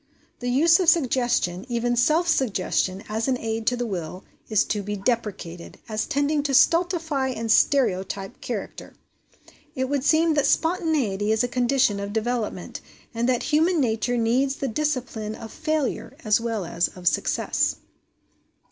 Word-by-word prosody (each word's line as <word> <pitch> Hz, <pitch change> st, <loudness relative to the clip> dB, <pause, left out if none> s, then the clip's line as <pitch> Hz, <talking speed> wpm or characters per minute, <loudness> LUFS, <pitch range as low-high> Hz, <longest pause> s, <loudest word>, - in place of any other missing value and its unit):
The 245 Hz, -, -3 dB
use 325 Hz, +7 st, +5 dB
of 360 Hz, -3 st, +4 dB
suggestion 245 Hz, -, +1 dB
even 240 Hz, 0 st, 0 dB
self 310 Hz, +8 st, +2 dB
suggestion 195 Hz, -, 0 dB
as 220 Hz, +3 st, -2 dB
an 260 Hz, -1 st, +1 dB
aid 225 Hz, -1 st, -4 dB
to 250 Hz, -, +2 dB
the 245 Hz, -, -2 dB
will, 180 Hz, -3 st, -5 dB, 0.3 s
is 215 Hz, -2 st, +3 dB
to 210 Hz, -, -2 dB
be 205 Hz, +1 st, -4 dB
deprecated, 195 Hz, -5 st, -3 dB
as 215 Hz, -1 st, -2 dB
tending 290 Hz, 0 st, +1 dB
to 280 Hz, -2 st, 0 dB
stultify 330 Hz, -2 st, +2 dB
and 230 Hz, -3 st, -2 dB
stereotype 195 Hz, -4 st, +1 dB
character. -, -, -6 dB, 0.8 s
It 260 Hz, 0 st, -2 dB
would 280 Hz, -2 st, 0 dB
seem 315 Hz, +2 st, +3 dB
that 290 Hz, -2 st, +2 dB
spontaneity 295 Hz, -, +1 dB
is 220 Hz, +2 st, +2 dB
a -, -, +1 dB
condition 245 Hz, -4 st, +1 dB
of 200 Hz, 0 st, -5 dB
development, 225 Hz, 0 st, -3 dB, 0.3 s
and 235 Hz, +2 st, 0 dB
that 250 Hz, -2 st, +1 dB
human 320 Hz, +3 st, +2 dB
nature 240 Hz, -1 st, 0 dB
needs 250 Hz, +4 st, +1 dB
the 275 Hz, -, -3 dB
discipline 240 Hz, -5 st, -2 dB
of 225 Hz, -1 st, -10 dB
failure 310 Hz, -3 st, -2 dB
as 215 Hz, 0 st, +2 dB
well 225 Hz, -5 st, -2 dB
as 170 Hz, +1 st, 0 dB
of 180 Hz, -1 st, -7 dB
success.) -, -, +1 dB
245 Hz, 155 wpm, -24 LUFS, 215-285 Hz, 0.8 s, use